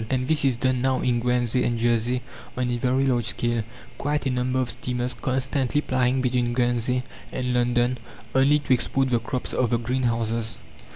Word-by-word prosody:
And 130 -1 0
this 155 -1 +2
is 130 -4 +2
done 130 0 +1
now 130 0 +1
in 120 -1 +1
Guernsey 125 0 +2
and 120 - 0
Jersey 120 +1 +1 0.3
on 125 -1 0
a 120 - 0
very 130 +2 +1
large 120 -4 +1
scale, 120 0 0 0.4
quite 145 +1 -1
a 135 - +1
number 125 +1 0
of 125 -2 0
steamers 125 0 -3
constantly 130 +2 0
plying 130 -1 +1
between 125 -1 +1
Guernsey 120 0 +1 0.3
and 125 -1 -2
London, 120 0 +1 0.3
only 135 +3 +5
to 140 -3 +1
export 130 +1 +1
the 120 - +3
crops 125 +2 -4
of 125 - +1
the 120 - +2
greenhouses. 115 -2 -1
125 Hz, 180 wpm, -25 LUFS, 120-130 Hz, 0.4 s, only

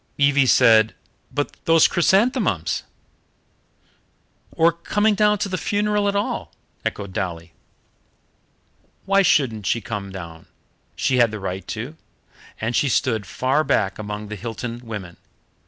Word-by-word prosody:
Evie 140 -1 +4
said: 110 -4 +5 0.4
"But 145 - -3
those 165 -1 +6
chrysanthemums 190 - +1 0.8
" - - -40
"Or 165 +1 +5
coming 205 +6 +1
down 210 0 +3
to 205 - -2
the 185 -2 -3
funeral 205 0 0
at 200 - 0
all 200 - -2 0.2
" - - -41
echoed 100 -2 -4
Dolly. 85 -4 -4 1.5
"Why 195 +1 +4
shouldn't 115 - +2
she 115 - +1
come 100 -2 -6
down? 85 -4 -9 0.5
She 130 -2 +1
had 120 -2 +5
the 110 0 -6
right 95 0 -5
to, 125 +8 -6 0.6
and 115 +2 -2
she 140 - +2
stood 115 -5 0
far 130 +10 +1
back 105 -10 0
among 105 0 -6
the 105 - -5
Hilton 115 +3 -5
women. 100 -7 -7
120 Hz, 140 wpm, -22 LUFS, 105-170 Hz, 1.5 s, those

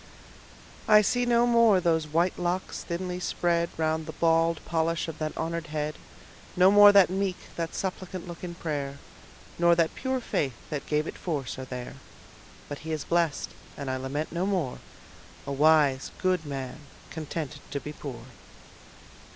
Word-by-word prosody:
I 210 -1 +7
see 245 +4 +1
no 240 0 +4
more 230 -5 +5
those 160 -3 +1
white 170 +5 +1
locks 180 +1 -2
thinly 180 +1 -3
spread 170 -1 0
Round 160 0 0
the 160 - -6
bald 165 0 +2
polish 165 0 0
of 160 -1 -7
that 155 -1 -3
honored 165 0 -3
head: 150 0 -2 0.6
No 185 +1 +6
more 205 0 +9
that 200 -3 +6
meek, 190 -1 -1 0.2
that 165 -1 -3
suppliant 185 -1 -4
look 170 0 -9
in 175 -1 -5
prayer, 140 -4 -3 0.6
Nor 170 0 +5
that 165 -1 +2
pure 260 0 -2
faith 140 - -1 0.2
that 145 -2 -4
gave 150 0 +1
it - - -7
force, 145 -7 -3
are 130 - -5
there: 125 -1 -7 0.7
But 145 - -6
he 160 +1 -6
is 155 -2 -2
blest, 170 -3 0 0.3
and 140 -2 -3
I 130 - -1
lament 135 +4 -3
no 175 +3 -1
more, 180 -11 -1 0.7
A 140 - -4
wise 145 -2 +4
good 185 -4 0
man, 135 0 -5 0.3
contented 150 -2 -5
to 140 - -3
be 150 +2 -7
poor. 130 -6 -8
165 Hz, 165 wpm, -27 LUFS, 150-180 Hz, 0.7 s, more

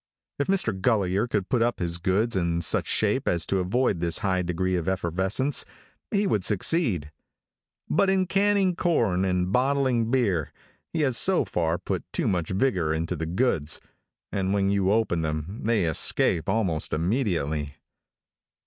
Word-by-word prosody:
If 140 - 0
Mr. 190 - +1
Gulliher 100 +1 +1
could 105 -5 -1
put 125 -3 0
up 120 +1 +1
his 85 -1 -1
goods 100 +6 +1
in 85 -2 0
such - - +2
shape - - +2
as 85 -2 +1
to 95 - 0
avoid 100 +1 0
this 85 -1 +1
high 95 -1 +1
degree 90 +1 -1
of 85 -1 -2
effervescence, 95 - 0 0.5
he 205 -2 +1
would 105 - 0
succeed; 100 - 0 0.8
but 200 0 +2
in 190 -1 +2
canning 195 -1 +2
corn 115 - +1
and 90 -1 0
bottling 130 -2 +1
beer, 100 - 0 0.4
he 160 - -1
has 130 -5 +2
so 190 -2 +3
far 85 -1 -1
put - - -4
too - - -1
much 85 -4 -1
vigor 95 -6 0
into 85 +3 -2
the 80 0 -4
goods, 85 - 0 0.5
and 95 0 -1
when 100 -1 +1
you 100 -1 +1
open 105 -6 +1
them, 80 +7 -4
they 110 -5 +2
escape 80 +2 +1
almost 95 -7 0
immediately. 80 - -1
95 Hz, 160 wpm, -25 LUFS, 85-125 Hz, 0.8 s, so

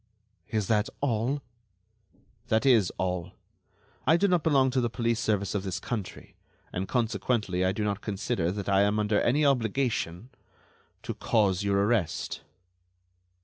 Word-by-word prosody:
"Is 110 -3 0
that 105 +1 +1
all?" 130 +2 0 1.0
"That 110 +4 +1
is 115 -9 +4
all. 90 -1 -2 0.7
I 160 +3 +6
do 200 - +3
not 180 -3 +2
belong 135 -5 +3
to 130 0 +1
the 120 - 0
police 115 0 -1
service 105 -4 0
of 100 - -1
this 95 -3 -4
country, 110 -6 -6 0.4
and, 95 +2 -2
consequently, 115 -5 0
I 95 - +2
do 105 +2 -3
not 105 -1 -1
consider 100 -3 -1
that 100 0 -5
I 100 -1 +4
am 100 +1 +2
under 105 0 +1
any 145 +5 +2
obligation... 120 -5 0 0.7
to - - -4
cause 100 -4 +1
your 100 -1 +1
arrest." 105 -7 -1
110 Hz, 145 wpm, -28 LUFS, 100-125 Hz, 1.0 s, I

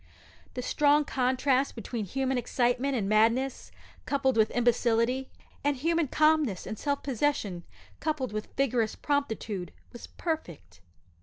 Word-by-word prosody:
The 250 - -3
strong 295 +2 +3
contrast 260 +1 +1
between 225 -1 -4
human 265 +6 -1
excitement 245 +2 0
and 210 -5 -1
madness 230 +6 +2 0.4
coupled 275 -2 +1
with 220 -1 +4
imbecility, 240 +1 +1 0.3
and 285 -1 +1
human 330 +3 +1
calmness 305 - +2
and 215 - -4
self 285 -1 -1
possession 235 -9 -1 0.4
coupled 285 -7 -2
with 215 0 -3
vigorous 245 -5 +1
promptitude, 220 - -2 0.2
was 240 - -9
perfect. 245 - -5
255 Hz, 125 wpm, -28 LUFS, 225-280 Hz, 0.4 s, with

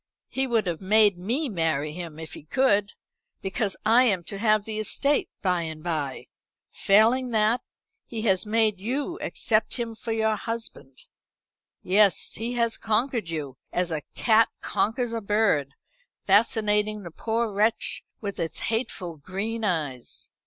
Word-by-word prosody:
He 265 0 0
would 230 -4 +1
have 170 -1 -3
made 205 -1 +4
me 245 - -1
marry 160 - -1
him 170 -2 -7
if 160 -1 -8
he - - -8
could, 205 - +1 0.5
because 195 +1 -1
I 235 +4 +6
am 190 -7 +2
to 200 +3 -6
have 215 -1 +3
the 215 -1 -4
estate 280 +7 +1
by 180 -3 +2
and 160 -1 -6
bye. 150 -6 -3 0.5
Failing 230 +6 +3
that, 220 +1 +2 0.5
he 225 -2 -5
has 190 -5 +2
made 215 -2 +1
you 280 - -2
accept 220 -1 0
him 235 -2 -3
for 225 +1 -6
your 220 -1 +1
husband. 225 - -7 0.8
Yes, 200 +1 +3
he 230 +3 -3
has 235 -2 0
conquered 225 -2 0
you, 145 -5 -5
as 180 -1 -1
a 155 -2 -2
cat 225 -1 +4
conquers 230 +2 -1
a 230 - -2
bird, 200 -10 +1 0.5
fascinating 210 0 +2
the 170 - -8
poor 225 +4 -1
wretch 215 +3 +1 0.2
with 200 -2 -5
its 165 -1 -3
hateful 195 -7 -3
green 200 +9 -4
eyes. 150 - -3
210 Hz, 150 wpm, -26 LUFS, 180-230 Hz, 0.8 s, I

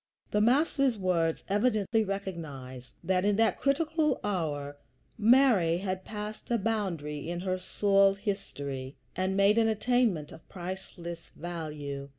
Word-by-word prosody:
The 210 - +2
Master's 270 +1 +3
words 170 -4 0
evidently 215 +1 +2
recognize 155 -11 -6
that 185 +1 +1
in 205 0 +3
that 225 +1 +2
critical 300 +1 +1
hour 145 -7 -2 0.4
Mary 220 -7 +5
had 185 0 -3
passed 210 +1 -7
a 240 - +2
boundary 175 -9 -2
in 175 0 -3
her 185 0 -1
soul 195 +1 +3
history, 140 - -5 0.2
and 190 +1 0
made 200 +3 +5
an 225 - +4
attainment 220 -7 +1
of - - -14
priceless 175 -2 -7
value. 150 -5 -5
190 Hz, 130 wpm, -29 LUFS, 165-215 Hz, 0.4 s, Mary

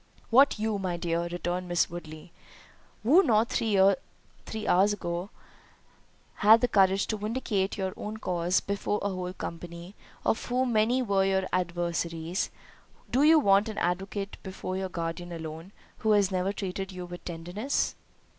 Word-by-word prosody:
"What 270 +3 +6
you, 215 -1 -1
my 180 -3 -2
dear," 170 0 -1
returned 175 +1 -3
Miss 175 -1 +2
Woodley, 165 -1 -9 0.7
"who 295 - +6
not 230 - +3
three 220 -3 +1 0.9
hours 195 +3 +4
ago 175 -1 -4 1.1
had 220 +2 +7
the 245 - +3
courage 195 -2 +3
to 215 - -2
vindicate 210 -3 -1
your 190 -1 -2
own 215 +1 -6
cause 180 -3 0
before 200 +1 -1
a 200 - +1
whole 180 -1 -4
company, 170 +1 -7 0.3
of - - +1
whom 250 0 0
many 230 +4 +3
were 200 -4 +2
your 190 -1 +1
adversaries; 175 0 -1 0.6
do 255 - +3
you 315 +2 +7
want 200 -3 +4
an 215 - -6
advocate 195 +3 -2
before 185 -1 -5
your 190 0 -2
guardian 170 0 -4
alone, 165 +2 -7 0.3
who 220 -1 +3
has 200 -2 +3
ever 185 +1 0
treated 195 -1 -4
you 180 -1 -6
with 175 0 -9
tenderness?" 175 +10 -2
190 Hz, 150 wpm, -28 LUFS, 175-215 Hz, 1.1 s, had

